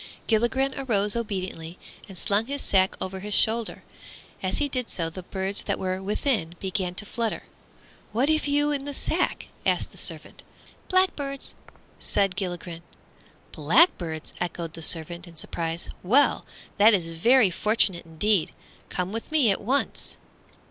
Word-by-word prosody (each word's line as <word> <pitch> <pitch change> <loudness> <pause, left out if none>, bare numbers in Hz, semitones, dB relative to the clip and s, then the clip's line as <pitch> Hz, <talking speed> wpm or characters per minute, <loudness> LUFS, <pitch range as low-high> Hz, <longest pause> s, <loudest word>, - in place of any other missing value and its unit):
Gilligren 240 +4 +2
arose 210 -6 +2
obediently 185 -6 -4 0.3
and 190 - -10
slung 205 +5 +1
his 280 +1 -3
sack 190 -1 +2
over 190 0 -3
his 210 +2 -2
shoulder. 225 0 +2 0.6
As 185 0 -1
he 295 - +1
did 255 -3 -3
so 165 -2 -1
the 185 - -7
birds 190 +2 -3
that - - 0
were 185 0 -2
within 200 - -1
began 185 -2 -2
to 205 - -3
flutter. 230 +1 -2 0.7
"What 245 +6 +1
have 310 -1 +2
you 290 +1 +2
in 280 -1 -2
the 285 -1 -5
sack?" 345 +6 -1
asked - - +1
the - - -6
servant. - - -3 0.5
"Blackbirds," 300 -8 0 0.5
replied 195 -2 +1
Gilligren. 175 -3 -4 0.7
"Blackbirds!" 165 - +2
echoed 170 -2 -3
the 165 - -8
servant, 170 +2 +1
in 165 -1 -14
surprise, 165 +1 -4
"well, 255 +11 +3 0.3
that 215 +1 +8
is 170 -4 -2
very 215 +6 +4
fortunate 195 -2 +2
indeed. 165 +3 +1 0.4
Come 180 +1 -2
with 225 +6 -5
me 285 -9 +4
at 195 - -1
once!" 260 +7 -1
200 Hz, 150 wpm, -26 LUFS, 175-250 Hz, 0.7 s, that